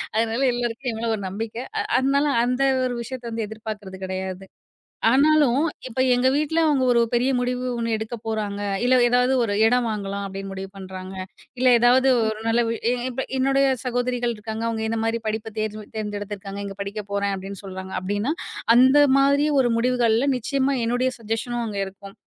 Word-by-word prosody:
அதனால 225 +2 +1
எல்லாருக்கும் 240 +1 -2
எம்மேல 225 +1 -2
ஒரு 200 - -7
நம்பிக்கை. 225 +5 -5 0.2
அ - - +2 0.2
அதனால 280 +2 +2 0.2
அந்த 250 +2 -1 0.2
ஒரு 245 -1 -2
விஷயத்த 250 -1 -6
வந்து 225 -1 -3
எதிர்பார்க்குறது 210 -3 -7
கிடையாது. 190 0 -5 0.6
ஆனாலும் 285 +1 +4 0.2
இப்ப 255 +1 -6
எங்க 245 +1 +2
வீட்ல 305 +2 +1
அவங்க 280 -3 +2
ஒரு 235 -1 +4
பெரிய 250 +3 +2
முடிவு 250 0 -2
ஒண்ணு 230 -1 -1
எடுக்கப்போறாங்க. 220 -2 -4 0.2
இல்ல 255 +1 +4
ஏதாவது 250 +1 +3
ஒரு 205 -3 -1
இடம் 245 +1 +3
வாங்கலாம் 200 -2 -3
அப்டின்னு 195 0 -6
முடிவு 195 0 -6
பண்றாங்க. 190 0 -8 0.5
இல்ல 255 - +3
ஏதாவது 250 +3 +5 0.2
ஒரு 220 0 -2
நல்ல 235 +1 +3
வி 230 - -1 0.2
எ - - +2 0.2
இப்ப 265 +2 -3
என்னுடைய 275 +1 +3 0.2
சகோதரிகள் 245 -1 -1
இருக்காங்க. 220 +1 -5
அவங்க 220 -1 -2
இந்த 225 0 -1
மாதிரி 225 +1 0
படிப்ப 220 0 -3
தேர்வு 215 -1 -3
தேர்ந்தெடுத்து 205 -1 -4
இருக்காங்க. 195 +1 -7
"இங்க 195 -1 -7
படிக்கப்போறேன்." 200 0 -3
அப்டின்னு 195 +1 -8
சொல்றாங்க 190 0 -7
அப்டின்னா, 205 +9 -1 0.4
அந்த 260 +4 +6 0.2
மாதிரியான 280 -1 +3
முடிவுகள்ல 245 +1 +2
நிச்சயமா 275 +3 0
என்னுடைய 245 +2 +1
சஜ்ஜஷனும் 230 +2 -3
அங்க 205 -2 -4
இருக்கும். 195 +1 -12
230 Hz, 165 wpm, -23 LUFS, 205-250 Hz, 0.6 s, அந்த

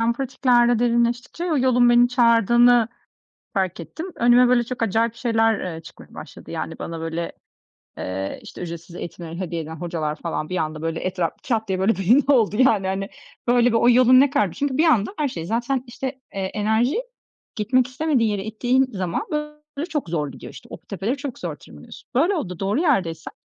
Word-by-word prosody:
ben 230 +1 +2
pratiklerle 245 -2 +2
derinleştikçe 240 +6 0
yolun 255 -7 +3
beni 240 0 +5
çağırdığını 240 -1 +4 0.7
fark 190 -4 -1
ettim. 170 - -7
Önüme 245 +1 +5
böyle 245 -1 +3
çok 240 0 -4
acayip 225 +2 +1
şeyler, 225 -3 +1 0.2
eee, 160 - -8
çıkmaya - - -15
başladı, - - -11
yani, - - -5
bana 165 -1 -5
böyle, 165 +1 -4 0.7
eee, 95 +1 -4
işte - - -10
ücretsiz 170 0 -7
eğitimleri 170 -1 -7
hediye 170 -3 -3
eden 160 +1 -7
hocalar 160 -2 -3
falan 155 -1 -4
bir 185 - -2
anda 155 -2 -3
böyle 165 0 -2
etraf 180 -2 -1
2 255 - -3
haftaya 215 -4 -1
böyle 195 +3 +2
belli 225 +10 +4
oldu, 220 -5 +2
yani, 220 -7 +3
hani, 195 +1 -2 0.4
böyle 245 0 +4
bir 230 - +2
o 235 +1 +4
yolun 255 +1 +6
ne 280 +1 +5
kadarmış 210 - 0
çünkü 280 -2 -1
bir 320 - +4
anda 255 - +2
her 300 - +1
şey 170 -11 -6
zaten 240 +6 -1
işte, 245 +2 -5 0.3
eee, 195 - -2
enerji 220 - +1 0.6
gitmek 240 +4 +2
istemediği 255 -2 0
yere 200 -2 -3
ittiğin 245 +4 +1
zaman 185 -3 -2 0.5
böyle 295 +4 -3
çok 295 - -3
zor 150 -3 -1
gidiyor, - - -10
işte. - - -13
O - - -7
tepeleri 200 - -3
çok 280 -2 -6
zor - - -5
tırmanıyorsun, - - -14
böyle 330 +11 +3
oldu 180 - -4
doğru 200 +9 0
yerdeysen 180 - 0
230 Hz, 185 wpm, -22 LUFS, 180-250 Hz, 0.7 s, yolun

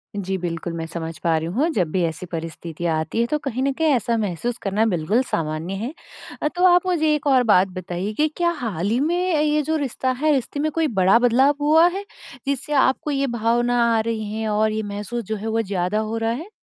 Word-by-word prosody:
जी, 190 -1 -2
बिल्कुल 170 -1 -4
मैं 165 -1 -4
समझ 165 -1 -6
पा 165 -1 +2
रही 160 - -3
हूँ, 305 +6 +2
जब 180 -5 +1
भी 185 - 0
ऐसी 165 +3 -4
परिस्थिति 165 0 -6
आती 160 +6 -1
है, - - +2
तो 300 - 0
कहीं 260 -2 -3
न 275 - +2
कहीं 320 +3 0
ऐसा 235 -1 +1
महसूस 215 +4 -2
करना 205 +3 +1
बिल्कुल 195 +4 +1
सामान्य 160 -1 -3
है। 230 +9 -4 0.5
अ, - - +1
तो 355 +4 +1
आप 360 0 +5
मुझे 315 -4 +2
एक 295 -1 -3
और 260 -3 +5
बात 190 -4 +4
बताइए 185 +2 -5
कि 305 +8 +2
क्या 345 -1 +2
हाल 200 -5 -2
ही 235 +4 +1
में, 330 +5 +1 0.2
ये 300 0 +2
जो 315 +2 -1
रिश्ता 260 -2 -1
है, 310 0 +3
रिश्ते 275 +1 -2
में 310 +1 0
कोई 320 0 +1
बड़ा 195 -1 +4
बदलाव 255 +4 +4
हुआ 320 +3 +5
है, 390 +3 -3 0.4
जिससे 280 +2 -2
आपको 270 +2 +2
ये 275 0 0
भावना 240 +1 +1
आ 225 - +3
रही 220 -2 -3
हैं 220 0 -2
और 215 +1 +2
ये 215 0 -2
महसूस 205 +3 -4
जो 220 +2 -3
है, 215 +2 -5
वो 225 +1 +1
ज़्यादा 195 0 -1
हो 220 +1 -2
रहा 225 0 0
है? 320 - -5
225 Hz, 230 wpm, -22 LUFS, 185-280 Hz, 0.5 s, आप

